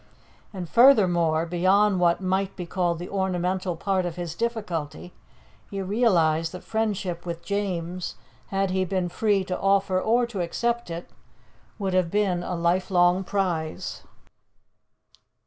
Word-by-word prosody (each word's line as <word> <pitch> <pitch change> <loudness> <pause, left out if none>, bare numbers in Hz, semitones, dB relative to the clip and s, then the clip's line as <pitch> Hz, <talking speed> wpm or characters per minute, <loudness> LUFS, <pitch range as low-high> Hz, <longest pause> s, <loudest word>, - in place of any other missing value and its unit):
And 185 -4 -6
furthermore, 175 - +4
beyond 185 +3 +3
what 170 +1 +3
might 190 +1 -1
be 180 - -5
called 175 -1 -1
the 175 +2 -6
ornamental 185 -1 -1
part 190 +2 0
of 175 -2 -4
his 175 -3 -5
difficulty, 180 -8 -4 0.6
he 200 - -5
realized 175 -7 +2
that 180 - -8
friendship 200 -6 -2
with 170 -1 -6
James, 185 -3 -3 0.3
had 195 -1 0
he 190 0 +1
been 185 -1 -1
free 200 +1 +1
to 185 0 -4
offer 195 -1 +2
or 240 +4 +2
to 220 -6 -4
accept 235 +6 -1
it, 170 +1 -7 0.7
would 195 -3 -2
have 185 -2 +2
been 195 -2 +1
a 180 0 -3
lifelong 175 +1 +2
prize. 175 -5 -2
185 Hz, 135 wpm, -25 LUFS, 175-200 Hz, 0.7 s, furthermore